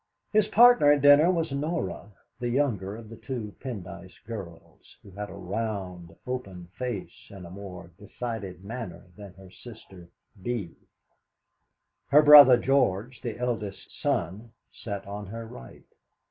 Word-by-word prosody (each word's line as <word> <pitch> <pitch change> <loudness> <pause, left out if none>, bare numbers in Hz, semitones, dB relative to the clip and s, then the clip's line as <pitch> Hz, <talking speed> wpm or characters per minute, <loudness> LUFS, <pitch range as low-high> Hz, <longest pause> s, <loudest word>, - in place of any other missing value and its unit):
His 215 -1 +3
partner 240 -10 +6
at 145 -1 -1
dinner 145 +4 +7
was 165 -5 0
Norah, 145 - -3 0.3
the 120 -1 -2
younger 120 -7 -1
of 115 0 -11
the 115 +1 -11
two 115 -3 -6
Pendyce 95 -7 -8
girls, 95 -7 -10
who 100 - -14
had 105 +2 -7
a - - -10
round, 95 -4 -5
open 95 -9 -6
face, 125 -7 -6
and 95 -3 -11
a 85 - -11
more 90 -3 -10
decided 100 -3 -7
manner 105 -6 -7
than 100 -3 -12
her 95 -1 -15
sister 95 -6 -14 0.3
Bee. 105 -5 -4 1.3
Her 150 +2 +6
brother 145 -4 +10
George, 125 -3 0
the 115 -4 -5
eldest 115 -5 -4
son, 110 - -2 0.2
sat 100 -3 -7
on 100 0 -7
her 115 +3 -7
right. 60 - -13
110 Hz, 140 wpm, -27 LUFS, 95-125 Hz, 1.3 s, brother